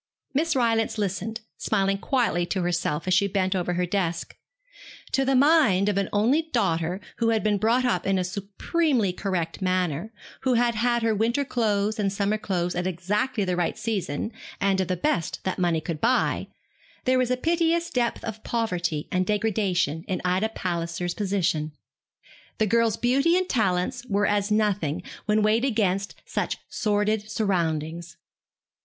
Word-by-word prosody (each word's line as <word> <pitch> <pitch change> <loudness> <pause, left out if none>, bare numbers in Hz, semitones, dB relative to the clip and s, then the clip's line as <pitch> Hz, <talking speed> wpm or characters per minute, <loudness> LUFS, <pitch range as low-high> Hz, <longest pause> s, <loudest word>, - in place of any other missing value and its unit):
Miss 315 +3 +1
Rylance 230 -3 +1
listened, 210 +3 -2 0.2
smiling 195 -2 +1
quietly 235 -8 +1
to 185 -1 -1
herself 175 -2 -1
as 185 - +3
she 200 +2 +4
bent 190 -1 0
over 180 -1 -1
her 180 +1 0
desk. 175 -2 -2 0.8
To 270 - +2
the 270 0 +2
mind 255 - +4
of 200 - 0
an 195 - -1
only 235 +10 +3
daughter, 175 -5 0 0.2
who 230 -1 +2
had 225 -1 +1
been 210 -1 +2
brought 235 +5 +2
up 180 -8 0
in 195 -1 +2
a 185 - +1
supremely 205 - 0
correct 180 -3 -3
manner, 185 0 0 0.3
who 255 -2 +2
had 240 0 +3
had 235 +1 +1
her 225 -1 +2
winter 235 +6 +1
clothes 215 -5 0
and 200 -2 +1
summer 200 +2 0
clothes 180 -4 -1
at 180 +1 -1
exactly 205 +6 -1
the 180 -1 0
right 175 -1 -1
season, 215 -4 -2 0.3
and 195 -1 +2
of 185 - -1
the 185 0 -1
best 175 - -1
that 190 - -2
money 170 -3 +2
could 155 -1 -5
buy, 250 +3 +1 0.6
there 255 0 +3
was 250 -1 +1
a 255 - +1
piteous 335 +3 +1
depth 240 -2 0
of 220 -1 -6
poverty 175 -9 -1
and 185 0 +1
degradation 195 -7 0
in 185 - -1
Ida 185 +5 +1
Palliser's 175 -3 -3
position. 185 -7 -1 0.8
The 220 - +2
girl's 230 0 +2
beauty 275 +9 +3
and 370 0 0
talents 195 - 0
were 205 -1 +1
as 205 0 +1
nothing 205 -6 0 0.2
when 210 0 +3
weighed 220 +3 +3
against 200 -6 0
such - - -2
sordid 210 0 0
surroundings. 170 -5 -1
205 Hz, 165 wpm, -25 LUFS, 180-230 Hz, 0.8 s, she